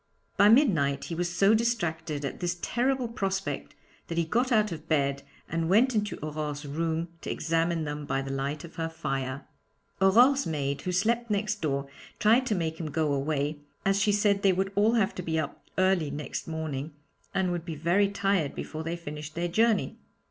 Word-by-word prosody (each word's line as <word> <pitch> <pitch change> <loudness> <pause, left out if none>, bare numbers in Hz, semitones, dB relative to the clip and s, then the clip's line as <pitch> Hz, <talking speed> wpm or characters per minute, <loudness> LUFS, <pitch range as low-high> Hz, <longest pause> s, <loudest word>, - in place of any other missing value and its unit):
By 205 - +6
midnight 180 - +4
he - - -5
was 175 +1 -1
so 195 +4 +4
distracted 165 -10 0
at - - -5
this 175 0 -1
terrible 255 +1 +1
prospect 195 -4 -3 0.3
that 165 - -4
he 170 - +2
got 245 +10 +1
out 215 -3 +3
of 160 -1 -7
bed 140 -3 +1 0.3
and 165 0 -1
went 240 +7 +4
into 210 -1 -1
Aurore's 150 -1 -4
room 165 +3 -2
to - - -6
examine 165 +1 0
them 145 -1 -5
by 135 - 0
the 135 - -5
light 140 +2 -3
of 170 - -12
her 165 0 -1
fire. 135 -4 -3 0.6
Aurore's 245 +9 +5
maid, 140 -3 -2
who 180 - -2
slept 230 +6 +1
next 210 +1 -1
door, 140 -2 -1 0.3
tried 235 +5 +4
to 215 - +1
make 160 -2 -2
him 160 -3 -3
go 150 -1 0
away, 145 +1 -1 0.3
as 195 0 +3
she 205 - +3
said 205 -1 +2
they 195 -2 +4
would 190 +2 -1
all 210 +3 +3
have 215 -4 +2
to - - -5
be 160 -2 -2
up 150 -2 -5
early 185 -5 +3
next 145 0 -5
morning 155 -2 -4 0.4
and 190 -2 +1
would 175 -2 -2
be 165 -2 -5
very 175 +6 +2
tired 195 -6 0
before 155 - -5
they 165 +2 -2
finished 150 -2 -7
their 170 +1 -1
journey. 220 +5 +1
170 Hz, 190 wpm, -28 LUFS, 150-200 Hz, 0.6 s, By